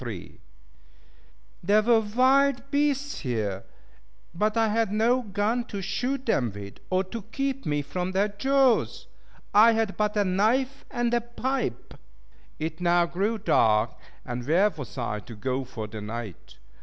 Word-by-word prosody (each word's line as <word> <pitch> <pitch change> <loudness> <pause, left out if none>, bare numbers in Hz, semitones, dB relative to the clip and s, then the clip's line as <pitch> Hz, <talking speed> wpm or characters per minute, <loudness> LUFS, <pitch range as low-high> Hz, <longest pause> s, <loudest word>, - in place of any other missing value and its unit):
There 205 +4 +3
were 230 0 +5
wild 260 +4 +2
beasts 285 0 0
here, 105 -7 -2 0.7
but 215 +5 0
I 225 -1 +3
had 220 -1 +1
no 230 +4 +2
gun 215 +2 -1
to 200 -3 -6
shoot 260 +7 -2
them 125 - +1
with, 100 -1 -9
or 185 +1 +2
to 220 +5 -7
keep 275 +1 -2
me 145 -1 0
from 180 +6 -3
their 195 +3 +1
jaws. 265 +4 +2 0.5
I 220 +3 +7
had 220 -3 -1
but 210 0 0
a 205 - +3
knife 235 +9 +1
and 240 -2 -1
a 240 - +3
pipe. 240 - -3 0.6
It 160 +2 -4
now 175 0 +3
grew 195 +7 -1
dark; 110 - +2 0.3
and 120 +1 -5
where 190 +7 +4
was 145 -7 -9
I 105 -4 -2
to 115 +2 -11
go 130 +5 -2
for 115 -4 -7
the 105 0 -8
night? 110 - -7
205 Hz, 150 wpm, -26 LUFS, 145-240 Hz, 0.7 s, I